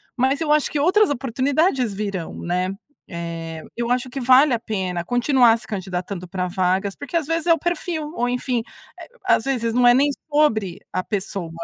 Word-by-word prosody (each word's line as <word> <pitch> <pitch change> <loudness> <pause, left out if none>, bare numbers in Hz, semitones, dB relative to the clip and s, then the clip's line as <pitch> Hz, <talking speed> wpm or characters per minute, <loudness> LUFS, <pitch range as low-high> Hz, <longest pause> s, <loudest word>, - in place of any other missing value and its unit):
mas 265 +3 +1
eu 310 -2 0
acho 300 -1 +3
que 295 - -2
outras 380 +6 +4
oportunidades 270 - 0
virão, 200 -5 -4
né, 180 +2 -1 0.4
eh, 165 -2 -6
eu 235 0 -2
acho 250 0 0
que 270 - -4
vale 260 +2 +6
a 230 - +1
pena 185 -6 -3
continuar 245 - +4
se - - -10
candidatando 185 -2 -5
pra 180 0 -3
vagas, 185 +2 0
porque 285 +4 -3
às 320 - -1
vezes 330 +2 -2
é 335 - +7
o - - +1
perfil, 335 -3 -2
ou 245 +1 0
enfim, 250 -1 -1 0.4
eh, - - -10 0.2
às - - +3
vezes 235 -4 -1
não 245 0 +4
é 240 - +8
nem 285 +2 +4 0.2
sobre 220 - +2 0.2
a 185 - -1
pessoa, 195 -4 -4
240 Hz, 190 wpm, -22 LUFS, 185-285 Hz, 0.4 s, é